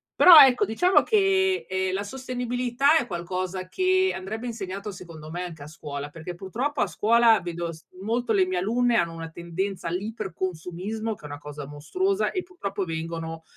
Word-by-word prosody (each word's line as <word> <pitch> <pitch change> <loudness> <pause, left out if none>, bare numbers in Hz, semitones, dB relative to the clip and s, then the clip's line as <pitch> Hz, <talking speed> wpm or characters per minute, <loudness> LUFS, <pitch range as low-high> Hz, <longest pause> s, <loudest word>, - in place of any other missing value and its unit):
Però, 350 -3 +10
ecco, 265 -3 +7
diciamo 355 - +3
che, 385 -3 +2
ehm, 190 0 -1
la 200 +1 -1
sostenibilità 250 +4 0
è 240 - -1
qualcosa 185 +1 -4
che 375 - +2
andrebbe 220 +6 -5
insegnato 200 -3 -5
secondo 165 -4 -10
me 175 +1 -4
anche 160 -5 -8
a - - -10
scuola, 145 -2 -7
perché 165 +3 -8
purtroppo 245 +11 -3
a - - +2
scuola 225 +4 +4
vedo 170 -1 -4
s 160 - -15 0.2
molto 230 +3 -1
le 190 -3 +4
mie 185 -1 -1
alunne 235 +4 +1
hanno 170 -1 +1
una 165 0 -7
tendenza 170 +2 -4
all'iper 200 +3 -4
consumismo 185 +6 -4
che - - -22
è - - -9
una 145 0 -7
cosa 145 0 -8
mostruosa, 370 - -1
e 370 - -2
purtroppo 200 - -4
vengono, 165 0 -5
195 Hz, 175 wpm, -25 LUFS, 170-245 Hz, 0.2 s, Però